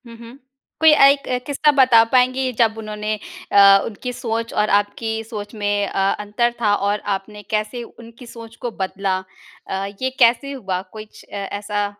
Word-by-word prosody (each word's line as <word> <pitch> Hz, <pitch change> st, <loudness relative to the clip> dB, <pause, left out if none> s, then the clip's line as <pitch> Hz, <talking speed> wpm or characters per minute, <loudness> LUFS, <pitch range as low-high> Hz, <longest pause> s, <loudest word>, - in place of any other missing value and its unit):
हुँ, 230 Hz, -, -11 dB
हुँ। 235 Hz, +2 st, -12 dB, 0.4 s
कोई 320 Hz, 0 st, +7 dB
एक 275 Hz, 0 st, +5 dB, 0.2 s
किस्सा 295 Hz, +1 st, +2 dB
बता 250 Hz, -4 st, +6 dB
पाएँगी 255 Hz, 0 st, +2 dB
जब 225 Hz, -2 st, +3 dB
उन्होंने 215 Hz, -1 st, -4 dB, 0.4 s
अ, 200 Hz, -1 st, +7 dB
उनकी 250 Hz, +3 st, -6 dB
सोच 230 Hz, -1 st, -4 dB
और 210 Hz, 0 st, +1 dB
आपकी 220 Hz, +2 st, -3 dB
सोच 210 Hz, -2 st, -8 dB
में 205 Hz, -1 st, -1 dB
अ, -, -, -4 dB, 0.2 s
अंतर 210 Hz, +4 st, 0 dB
था 210 Hz, -2 st, +3 dB
और 205 Hz, +1 st, -1 dB, 0.2 s
आपने 205 Hz, +2 st, -10 dB
कैसे 215 Hz, +3 st, -2 dB
उनकी 235 Hz, +1 st, -14 dB
सोच 230 Hz, -1 st, -11 dB
को 240 Hz, -, -3 dB
बदला? 190 Hz, 0 st, -1 dB, 0.5 s
अ, 195 Hz, 0 st, -2 dB, 0.2 s
ये 260 Hz, -, +1 dB
कैसे 245 Hz, +3 st, +3 dB
हुआ 195 Hz, -9 st, -4 dB
कुछ 215 Hz, -1 st, -11 dB
ए 200 Hz, -, -5 dB, 0.2 s
ऐसा 205 Hz, 0 st, -2 dB
220 Hz, 165 wpm, -20 LUFS, 205-240 Hz, 0.5 s, कोई